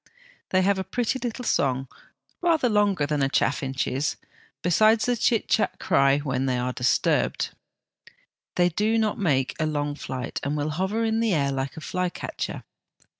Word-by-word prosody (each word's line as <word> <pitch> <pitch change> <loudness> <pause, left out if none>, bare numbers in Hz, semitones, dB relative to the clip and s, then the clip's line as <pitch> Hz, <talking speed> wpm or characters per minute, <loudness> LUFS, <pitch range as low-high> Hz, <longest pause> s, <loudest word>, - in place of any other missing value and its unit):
They 185 0 +3
have 195 0 +2
a - - -1
pretty 245 +5 -1
little 245 0 -4
song, 135 - +1 0.5
rather 330 -7 +3
longer 205 -8 +2
than 145 0 -1
a 135 - +2
chaffinch's, 135 +1 0 0.5
besides 215 +5 +4
the 245 - +1
chit 230 -1 +1
chat 220 - +1
cry 140 0 +3
when 135 -2 -1
they 125 -1 +1
are 125 +1 -1
disturbed. 125 +1 +1 1.0
They 175 0 +3
do 215 +6 +1
not 220 -2 0
make 135 -9 +1
a 155 - +1
long 145 -1 -1
flight, 130 -3 -5
and 145 +2 -2
will 150 +1 -1
hover 190 +8 -1
in 225 0 +1
the 225 -5 +2
air 140 -2 +1
like 135 +1 -3
a - - -6
flycatcher. 180 +2 -4
160 Hz, 165 wpm, -25 LUFS, 140-215 Hz, 1.0 s, besides